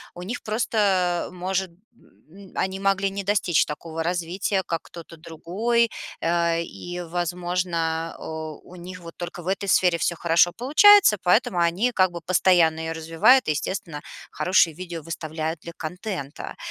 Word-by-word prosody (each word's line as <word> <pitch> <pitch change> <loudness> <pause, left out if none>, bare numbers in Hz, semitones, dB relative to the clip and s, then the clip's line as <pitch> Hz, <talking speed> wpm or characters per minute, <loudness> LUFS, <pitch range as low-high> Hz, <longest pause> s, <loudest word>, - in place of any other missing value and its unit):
у 175 - -8
них 205 +8 -5
просто 200 -5 0
может, 185 +1 -2
м, 170 - -24 0.5
м, 190 +2 -15
они 190 0 -2
могли 195 0 +1
не 195 0 -5
достичь 195 -4 +2
такого 160 +2 -6
развития, 180 +3 -1
как 165 -1 -3
кто-то 170 -1 -12
другой, 190 +9 -1 0.3
э, 170 0 +1
и, 175 +1 -7
возможно, 175 -1 -2
о, 160 -1 -7
у 180 - -14
них 180 +1 -9
вот 165 -1 -11
только 175 -1 -7
в - - -10
этой 195 +1 -2
сфере 180 -2 +3
всё 170 - 0
хорошо 170 +1 +3
получается, 310 - +6
поэтому 180 0 +2
они 175 +8 +2
как 185 -5 +2
бы 170 - -6
постоянно 175 -2 +3
её 160 0 -3
развивают 165 +9 +3
и, - - +4
естественно, 165 0 -4 0.3
хорошие 180 -3 +3
видео 170 0 -7
выставляют 160 0 -4
для 170 +1 -10
контента. 180 -4 -6
175 Hz, 155 wpm, -24 LUFS, 165-190 Hz, 0.5 s, получается